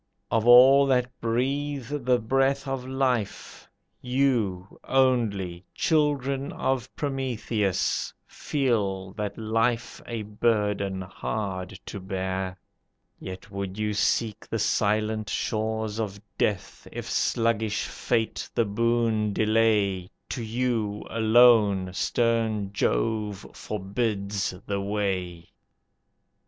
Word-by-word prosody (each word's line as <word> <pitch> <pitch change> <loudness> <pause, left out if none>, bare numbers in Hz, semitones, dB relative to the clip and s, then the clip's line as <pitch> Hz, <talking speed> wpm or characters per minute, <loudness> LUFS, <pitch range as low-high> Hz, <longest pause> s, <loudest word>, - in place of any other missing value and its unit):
Of 115 0 +1
all 135 +3 +8
that 125 -2 +2
breathe 135 +3 -1 0.2
the 125 -1 +4
breath 135 +4 +1
of 135 -1 -3
life, 130 -5 -2 0.3
You, 120 -8 0
only, 110 -10 +1
children 140 -3 +1
of 130 -2 -1
Prometheus, 120 - -1
feel 100 -9 -1
That 105 -1 -4
life 115 +2 0
a 115 -2 -4
burden 105 -3 0
hard 95 -1 -4
to 100 - -6
bear; 95 0 -3 0.6
Yet, 95 +2 -8
would 100 -1 -5
you 105 0 -1
seek 105 +1 0
the - - -1
silent 110 0 +1
shores 110 0 -2
of 100 -2 -3 0.2
death, 100 -4 -2
If - - -6
sluggish 110 -2 +1
fate 115 -2 -2
the 115 - +3
boon 110 0 +1
delay, 105 -4 +2 0.2
To 125 - -3
you, 115 -3 -1
alone, 110 -5 +5
stern 110 -2 0
Jove 105 - 0
forbids 100 -1 -2
the 100 -1 -2
way. 95 -4 -2
110 Hz, 100 wpm, -26 LUFS, 100-120 Hz, 0.6 s, all